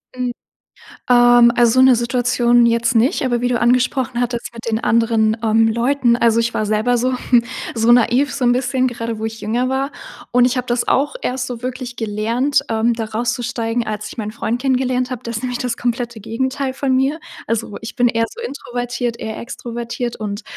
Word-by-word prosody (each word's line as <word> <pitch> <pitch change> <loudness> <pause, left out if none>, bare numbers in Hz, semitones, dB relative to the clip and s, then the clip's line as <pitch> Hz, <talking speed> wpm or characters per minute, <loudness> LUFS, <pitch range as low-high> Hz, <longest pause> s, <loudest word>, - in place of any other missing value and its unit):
Mhm. 250 -1 -2 0.8
Ähm, 240 -1 +6
also 240 -1 +4
so 255 - +5
'ne 260 -1 +7
Situation 240 0 +2
jetzt 235 +1 +2
nicht. 235 +4 +2
Aber 240 -2 0
wie 245 - +2
du 245 -1 0
angesprochen 245 0 +1
hattest 240 -1 -3
mit 230 - -9
den 220 - 0
anderen, 225 -1 +2
ähm, 225 0 +3
Leuten. 240 +1 +2
Also, 230 -1 +3
ich 235 0 -1
war 215 - 0
selber 215 +4 +1
so 255 +2 0 0.6
so 230 0 +3
naiv, 245 +4 +3
so 280 -2 -2
'n 245 - +4
bisschen, 255 +1 0
gerade 230 -2 -5
wo 220 - -3
ich 225 0 -7
jünger 240 +4 0
war. 270 +2 -1 0.4
Und 245 0 +5
ich 255 +1 0
habe 250 0 -2
das 240 0 -1
auch 285 - +1
erst 255 - -2
so 245 -2 -7
wirklich 250 -1 -5
gelernt, 230 +6 0
ähm, 225 +1 +1
da 225 -1 -3
rauszusteigen, 235 +1 -2
als 210 0 -4
ich - - -11
meinen 215 -2 -4
Freund 230 +1 -2
kennengelernt 255 -1 0
habe. 250 -3 -5
Der 235 - -5
ist 225 +1 -4
nämlich 250 -1 -3
das 245 -2 -2
komplette 240 -1 -3
Gegenteil 260 +5 -2
von 265 -1 0
mir. 275 +5 0 0.3
Also, 225 -2 -2
ich 225 - -7
bin 245 0 +3
eher 230 0 0
so 470 - -10
introvertiert, 245 - -4
er 220 0 -5
extrovertiert. 235 0 -5
Und 210 0 -5
240 Hz, 200 wpm, -19 LUFS, 230-250 Hz, 0.8 s, ne